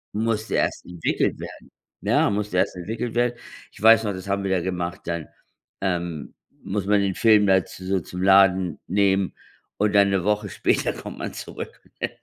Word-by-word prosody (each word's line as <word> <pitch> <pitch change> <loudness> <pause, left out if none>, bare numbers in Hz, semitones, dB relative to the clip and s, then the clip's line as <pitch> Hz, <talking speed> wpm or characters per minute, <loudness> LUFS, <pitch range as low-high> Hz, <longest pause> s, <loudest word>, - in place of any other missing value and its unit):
Musste 110 0 -1
erst - - 0
entwickelt 90 -2 -1
werden. - - -10 0.3
Ne, - - +2
musste 105 -2 -2
erst 95 - +1
entwickelt 110 +6 -4
werden. 120 0 +2 0.4
Ich - - -15
weiß 115 +1 +7
noch, 105 - -1
das 95 +1 -8
haben 100 0 0
wir 95 - -1
da 95 -2 +2
gemacht, 90 -1 -3
dann, 85 -2 -3 0.5
ähm 85 -5 -3 0.3
muss 100 0 -2
man 105 0 +4
den 100 -1 0
Film 110 -1 +5
da 95 -2 +4
zu 95 - -11
so 95 0 +1
zum 90 +2 -6
Laden 95 -3 +4
nehmen 95 0 +2 0.4
und 105 0 +1
dann 100 -1 +5
'ne 95 -2 0
Woche 105 +1 0
später - - 0
kommt - - -9
man - - -4
zurück, - - -8 0.2
ne? - - 0
95 Hz, 185 wpm, -24 LUFS, 90-105 Hz, 0.5 s, weiß